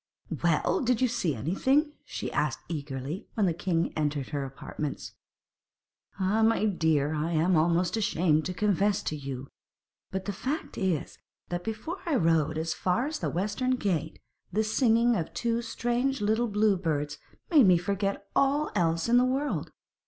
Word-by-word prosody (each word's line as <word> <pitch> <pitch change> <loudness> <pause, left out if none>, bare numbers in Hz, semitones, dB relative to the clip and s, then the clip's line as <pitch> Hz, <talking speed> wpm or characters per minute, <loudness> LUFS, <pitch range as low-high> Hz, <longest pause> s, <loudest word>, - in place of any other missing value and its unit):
'Well! - - +2
did 245 -2 +2
you 255 - +3
see 190 - -1
anything?' 265 - +1
she - - -5
asked - - -1
eagerly, 145 +1 -5
when 210 - +2
the 175 - +2
king 170 -1 -1
entered 145 -3 -1
her 145 -2 -2
apartments. 135 +2 -6 1.1
'Ah, 195 +4 +2
my 225 -1 +3
dear, 160 -7 +1
I 155 +2 -1
am 170 +3 +3
almost 170 +4 +2
ashamed 165 -7 +2
to 180 - -2
confess 205 0 +1
to 155 - -2
you. 135 -2 -6 0.6
But 190 0 -4
the 205 - -2
fact 275 +10 -4
is 185 -7 -2 0.3
that 175 0 -3
before 225 - -4
I 320 - +2
rode 160 - +2
as 160 0 -1
far 185 +9 0
as 305 +1 -3
the - - -1
western 215 +8 0
gate 170 - -1 0.3
the 215 +4 +1
singing 230 +1 +3
of 165 -5 -3
two 235 -1 0
strange 240 +3 -1
little 220 +3 +1
blue 210 -1 +2
birds 150 -5 -2 0.3
made 290 - +7
me 180 -2 +6
forget 200 +2 -2
all 285 +2 +2
else 165 -2 +1
in 240 +1 +5
the 250 - +5
world. 270 +3 -1
190 Hz, 165 wpm, -28 LUFS, 160-230 Hz, 1.1 s, made